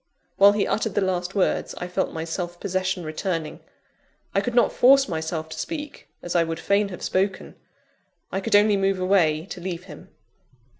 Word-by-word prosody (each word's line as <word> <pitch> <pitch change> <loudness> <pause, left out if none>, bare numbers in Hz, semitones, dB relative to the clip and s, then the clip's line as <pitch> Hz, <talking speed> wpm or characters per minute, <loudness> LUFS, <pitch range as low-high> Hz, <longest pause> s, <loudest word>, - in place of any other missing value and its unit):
While 200 +1 +7
he 205 -1 +1
uttered 220 -2 -1
the 205 - +2
last 185 0 -1
words, 195 - 0
I 180 - -5
felt 180 +1 -1
my 160 - -4
self 175 +1 -5
possession 185 -1 -2
returning. 160 0 -3 0.7
I - - +2
could 245 -1 -3
not 240 - +4
force 270 +2 +5
myself 160 -1 -3
to - - -7
speak, 295 -3 -6 0.2
as 175 - -4
I 170 - +4
would 165 0 -4
fain 200 +4 +1
have 180 - -8
spoken 190 +1 -1 0.8
I 195 - -2
could 195 - +1
only 205 0 +5
move 195 -1 +1
away, 175 -4 +2
to 185 - -8
leave 180 -1 -5
him. - - -12
185 Hz, 185 wpm, -24 LUFS, 170-200 Hz, 0.8 s, While